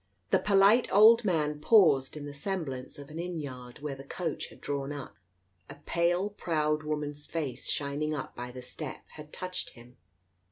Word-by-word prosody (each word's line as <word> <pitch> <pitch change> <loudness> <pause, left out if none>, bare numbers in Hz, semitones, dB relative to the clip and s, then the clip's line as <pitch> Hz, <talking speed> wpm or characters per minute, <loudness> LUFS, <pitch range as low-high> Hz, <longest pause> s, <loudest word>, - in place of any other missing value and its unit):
The - - +5
polite 205 +4 +5
old 225 +4 +8
man 150 -6 +1
paused 155 - +5
in 145 - -6
the 145 - -7
semblance 145 -5 -4
of 145 0 -10
an 160 - -6
inn 175 -1 -3
yard 125 -3 -8
where 150 -2 -2
the 135 0 -9
coach 165 +5 -4
had - - -16
drawn 140 0 -3
up. 145 -2 -7 0.5
A 140 - -8
pale 175 +6 0
proud 155 -5 0
woman's 150 -1 -4
face, 140 -7 -4
shining 145 +2 -1
up - - -6
by 120 0 -5
the 125 0 -9
step, 140 +2 -7
had 150 0 -12
touched 185 0 -5
him. 120 +1 -16
150 Hz, 175 wpm, -30 LUFS, 140-175 Hz, 0.5 s, old